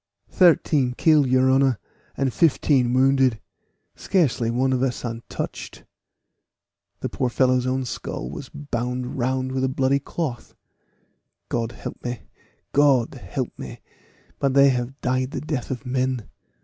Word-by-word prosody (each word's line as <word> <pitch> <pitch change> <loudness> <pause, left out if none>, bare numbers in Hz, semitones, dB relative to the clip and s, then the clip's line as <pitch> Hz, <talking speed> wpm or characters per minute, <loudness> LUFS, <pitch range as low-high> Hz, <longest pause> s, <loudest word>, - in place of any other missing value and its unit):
"Thirteen 155 -7 +4
killed, 155 -4 +4
your 130 +1 +4
honor, 135 -3 +3 0.4
and 135 -3 0
fifteen 135 -3 +3
wounded; 130 -2 +3 0.6
scarcely 135 -10 +1
one 130 +3 +1
of 125 - 0
us 130 -1 -1
untouched." 115 0 -6 1.2
The - - -2
poor 125 - -1
fellow's 130 0 +2
own 130 0 -1
skull 105 - -5
was 140 - -8
bound 125 -3 -4
round 130 +1 0
with 130 0 -1
a 130 - +2
bloody 135 +1 +1
cloth. 140 -3 -5 0.9
"God 115 -1 -2
help - - -8
me! 120 -2 -4 0.5
Gold 140 -5 +3
help - - -4
me! - - -8 0.6
but 135 -1 +1
they 140 0 +7
have 125 +2 -2
died 130 0 0
the - - -4
death 150 -5 -4
of 130 0 -5
men. 130 -3 -1
130 Hz, 135 wpm, -23 LUFS, 125-135 Hz, 1.2 s, they